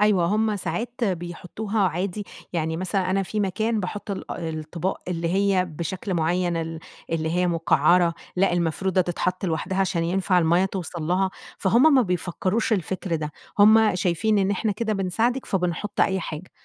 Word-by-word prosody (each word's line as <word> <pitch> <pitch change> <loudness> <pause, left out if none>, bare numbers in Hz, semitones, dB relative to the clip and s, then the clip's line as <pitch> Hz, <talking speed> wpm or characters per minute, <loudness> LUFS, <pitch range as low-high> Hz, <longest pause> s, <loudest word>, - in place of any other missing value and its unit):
أيوه، 210 -4 +4
هم 215 +2 +1
ساعات 235 +5 -3
بيحطوها 185 +3 -3
عادي، 190 +4 -3 0.3
يعني 160 -1 -1
مثلًا 185 +1 -1
أنا 195 +1 +2
في 210 +3 -3
مكان 215 +3 0
باحط 205 +3 -5
الا 185 -3 -4
الأطباق 160 +4 -3
اللي 170 -2 -1
هي 195 0 +2
بشكل 180 +3 -4
معيّن، 175 +1 +1
ال 165 0 -3 0.3
اللي 160 -1 -1
هي 180 +2 +1
مقعّرة، 170 +1 +3 0.2
لأ، 190 +1 +3
المفرودة 175 +2 +1
تتحط 180 +1 -1
لوحدها 180 +2 -1
عشان 170 -3 +1
ينفع 185 +1 +2
المَيّة 170 +2 +3
توصَل 180 -3 -4
لها، 185 +4 +1 0.3
فهُم 245 +10 +5
ما 260 - +6
بيفكروش 185 +3 -1
الفكر 185 -2 -1
ده، 150 -1 -4 0.3
هم 215 0 +6
شايفين 185 +4 +1
إن 195 0 +2
إحنا 205 +2 0
كده 220 +2 -2
بنساعدِك 220 +7 0
فبنحط 180 +1 -1
أي 190 0 +2
حاجة، 165 +1 -6
185 Hz, 160 wpm, -24 LUFS, 170-205 Hz, 0.3 s, ما